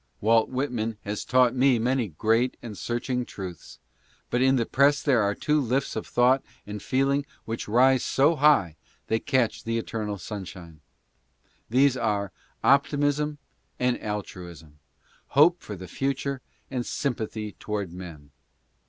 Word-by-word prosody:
Walt 115 +1 +3
Whitman 120 -4 -2
has 105 +1 -4
taught 125 -2 +3
me 130 -1 +4
many 125 +1 0
great 115 +8 +1
and 115 -3 -7
searching 125 +3 -2
truths, 95 -7 -9 0.5
but 120 - +1
in 130 +1 +4
the 120 -3 +1
press 140 +4 +3
there 130 -6 +3
are 100 0 +1
two 150 0 +1
lifts 130 +2 -1
of 110 - -4
thought 125 +2 +3 0.2
and 105 0 -6
feeling 135 +2 +1 0.2
which 115 +1 -4
rise 130 +4 +4
so 145 +5 +3
high 140 - +3 0.3
they 110 - +2
catch 120 -5 0
the 115 0 -1
eternal 110 -2 -3
sunshine. 90 -5 -8 0.9
These 130 +2 +4
are, 100 -4 -1 0.3
Optimism 145 +2 +2 0.4
and 125 -1 +1
Altruism 85 -7 -7 0.3
— - - -33
Hope 170 +4 +6
for 105 - -7
the 95 0 -9
future 135 +5 -2 0.3
and 125 -2 -1
Sympathy 110 -6 -3
toward 100 -5 -4
men. 85 -6 -10
120 Hz, 145 wpm, -26 LUFS, 105-135 Hz, 0.9 s, Hope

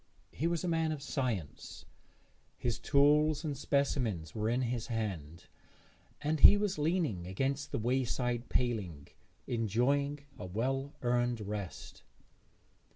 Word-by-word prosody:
He 160 - -1
was 170 0 -1
a - - -1
man 165 -2 +1
of 155 - -3
science; 115 - -3 0.7
his 120 -3 -2
tools 150 +2 +4
and 145 -2 -2
specimens 125 - 0
were 110 0 -1
in 125 +2 +1
his 120 -1 -2
hand, 90 -8 -4 0.8
and 150 +1 0
he 205 - +9
was 205 -4 -1
leaning 150 - 0
against 135 +9 -2
the - - -1
wayside 120 0 -1
paling, 100 - -1 0.4
enjoying 125 +6 +1 0.2
a 90 - -5
well 135 +8 -2
earned 120 -1 +1
rest. 100 -2 -6
125 Hz, 125 wpm, -32 LUFS, 110-145 Hz, 0.8 s, he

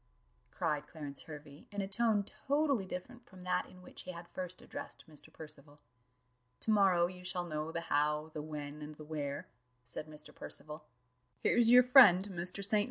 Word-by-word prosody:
cried 150 -3 -1
Clarence 145 -3 -6
Hervey, 150 -1 -11
in 205 0 -2
a 195 - -2
tone 210 0 +2 0.2
totally 280 -7 +2
different 240 +7 -7
from 185 -1 -13
that 180 0 0
in 180 - -15
which - - -9
he 185 - -6
had 170 -1 -9
first 180 -1 -4
addressed - - -7
Mr. 155 0 -7
Percival. 150 -2 -9 0.8
"To 220 - +1
morrow 190 -5 +5
you 180 +1 -7
shall 180 -1 -1
know 155 -1 -3
the 170 - -2
how, 150 0 +1
the 150 - -4
when, 150 -1 -6
and 150 +1 -7
the 155 - -10
where," 145 -2 -4 0.4
said 125 +6 -5
Mr. 150 0 -8
Percival: 150 0 -4 0.5
"here's 230 - +4
your 250 +1 +9
friend, 225 -7 +8
Mr. 180 +2 -1
St. 210 +1 +3
170 Hz, 175 wpm, -34 LUFS, 150-195 Hz, 0.8 s, your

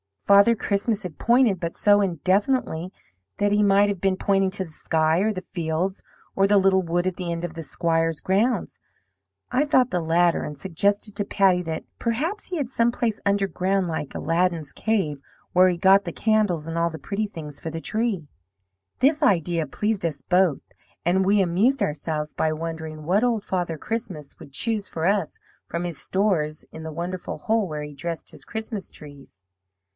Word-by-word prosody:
Father 200 +3 +6
Christmas 205 +1 -1
had 175 -4 -8
pointed, 235 -5 +3
but 170 -1 -4
so 205 -1 +4
indefinitely 185 - 0 0.5
that 205 0 +1
he 205 0 +3
might 200 0 +4
have 200 -3 -2
been 195 -1 +2
pointing 195 0 +1
to 190 0 0
the 165 - -11
sky, 160 +1 +1
or 215 +3 +2
the 185 - -5
fields, 175 +1 -3 0.3
or 195 0 +4
the 205 0 +4
little 190 -1 +4
wood 175 0 -1
at 185 -1 -1
the 180 -2 -3
end 170 0 -5
of 175 -2 -4
the 165 - -6
Squire's 165 0 0
grounds. 210 +7 0 0.7
I 255 +3 +3
thought 260 -4 +3
the 180 - +1
latter, 170 +1 +2
and 150 - -6
suggested 200 +5 0
to 205 - 0
Patty 190 -3 +3
that 160 -1 -4 0.2
perhaps 305 - -2
he 365 - -4
had 280 -6 -2
some 235 -2 +2
place 230 -3 -1
underground 195 -2 +1
like 155 -3 -4
Aladdin's 165 -2 0
cave, 190 -11 -1 0.3
where 185 +1 +6
he 175 - -1
got 195 +2 +5
the 170 - -4
candles, 210 -8 +1
and 165 0 -4
all 170 0 +2
the 160 - -7
pretty 205 +5 -3
things 150 -7 -8
for 160 - -5
the 165 +1 -5
tree. 215 -6 -1 0.7
This 295 +4 +3
idea 170 - +2
pleased 210 +4 -1
us 150 -4 -2
both, 180 -3 +2 0.4
and 190 +2 +2
we 200 +1 +4
amused 205 +8 +2
ourselves 150 -2 -3
by 155 0 0
wondering 160 -1 -6
what 190 +8 +2
Old 235 -4 +1
Father 175 -5 -2
Christmas 185 - -5
would 140 - -13
choose 215 +3 0
for 160 0 -3
us 195 -4 +1 0.3
from 170 +1 -3
his 170 -5 -4
stores 175 -7 0
in 160 - -9
that 160 -1 -6
wonderful 175 +3 -4
hole 220 -2 0
where 150 -2 -5
he 150 0 -8
dressed 165 +3 -5
his - - -11
Christmas 220 -3 -5
trees. 145 -9 -14
185 Hz, 185 wpm, -24 LUFS, 165-205 Hz, 0.7 s, Father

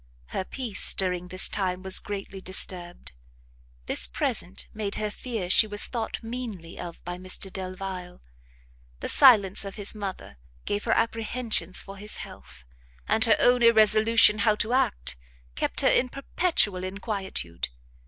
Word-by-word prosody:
Her - - -3
peace, 235 -1 +1
during 180 -2 -2
this 185 +1 +2
time, 185 -2 -3
was 190 0 +4
greatly 195 -1 -7
disturbed; 180 -2 -2 0.7
this - - +5
present 60 +1 -2
made 210 -2 -3
her 215 -1 -3
fear 225 -5 -5
she 215 +4 +5
was 205 -1 +5
thought 230 -1 -5
meanly 225 -8 -7
of 170 -1 -9
by 175 +1 -6
Mr 185 +1 -1
Delvile; 185 -1 -7 0.8
the - - -5
silence 210 -10 +5
of 195 -1 -8
his 205 -2 0
mother 195 - -7 0.3
gave 205 0 -3
her 225 - +1
apprehensions 225 -5 -2
for 195 0 -11
his 210 +2 -2
health, 60 - -12 0.4
and 220 - +2
her 225 - +4
own 245 0 +3
irresolution 220 -1 +5
how 215 -2 +2
to 220 +3 -2
act, 60 - -1 0.4
kept - - -1
her - - +4
in 250 - +2
perpetual 270 - 0
inquietude. 190 - -4
200 Hz, 145 wpm, -25 LUFS, 185-225 Hz, 0.8 s, this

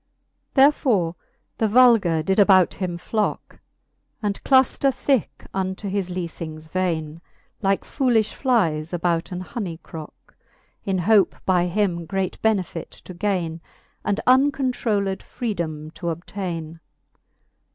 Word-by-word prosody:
Therefore 255 - +3 0.4
the 220 - +3
vulgar 215 -9 +5
did 190 +4 +1
about 190 -3 +5
him 180 -3 -3
flocke, 210 +4 -3 0.6
And 205 -1 -2
clufter 265 +1 +4
ihicke 265 -3 -1
unto 190 +1 -3
his 195 -2 -2
leafings 165 -3 -6
vaine, 165 -3 -2 0.4
Like 195 -1 +1
foolilh 240 -6 +1
flies 170 - +1
about 170 0 0
an 180 0 -4
hony 185 -5 -5
crocke, 160 -2 -11 0.5
In 195 -1 -1
hope 195 +1 +3
by 180 -2 +3
him 175 -3 -1
great 190 0 -2
benefite 190 -6 0
to 185 - -9
gaine, 175 -4 -2 0.4
And 205 0 0
uncontrolled 255 -7 +2
freedome 160 -9 -4
to 170 - -4
obtaine. 170 -1 -5
190 Hz, 115 wpm, -23 LUFS, 170-215 Hz, 0.6 s, vulgar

